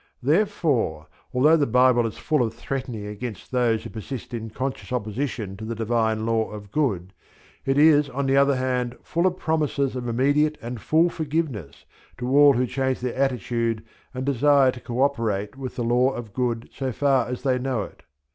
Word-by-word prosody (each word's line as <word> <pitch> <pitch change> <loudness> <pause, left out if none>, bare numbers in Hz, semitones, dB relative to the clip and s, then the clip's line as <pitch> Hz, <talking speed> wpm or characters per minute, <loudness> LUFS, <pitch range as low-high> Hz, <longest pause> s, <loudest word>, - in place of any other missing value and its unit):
Therefore 145 - +1 0.3
although 150 +6 +5
the 145 -3 +1
Bible 125 0 +4
is 110 - -8
full 150 -3 +1
of 115 -2 -1
threatening 120 -4 -5
against 105 +1 -7
those 120 -3 +1
who - - -8
persist 120 +3 -7
in 115 -1 -4
conscious 130 +5 -5
opposition 110 -3 -3
to 110 - -8
the 115 +1 -4
Divine 110 -1 0
Law 115 -1 +1
of 105 -2 -9
Good, 100 - -1 0.5
it 135 +1 +2
is 150 -1 +5
on 135 +2 -2
the 135 0 +2
other 140 0 +4
hand 125 -1 -1
full 170 +3 +1
of 180 0 -1
promises 150 -5 0
of 125 -1 -4
immediate 145 +6 +2
and 120 -1 -6
full 165 +3 +3
forgiveness 145 - -3 0.3
to 125 - -4
all 145 -1 +8
who 125 0 +1
change, 130 0 -1
their 125 -1 -2
attitude 115 -3 -1 0.3
and 130 0 -4
desire 140 0 +4
to 125 - -10
co 120 +2 -1
operate 110 -7 -1
with 135 -1 -6
the 120 - -2
Law 120 +2 +3
of 115 -4 -7
Good 120 -2 -2
so 135 -1 -3
far 135 -1 +2
as 125 0 -5
they 130 -2 +1
know 125 -4 -1
it. - - -12
125 Hz, 185 wpm, -24 LUFS, 115-140 Hz, 0.5 s, all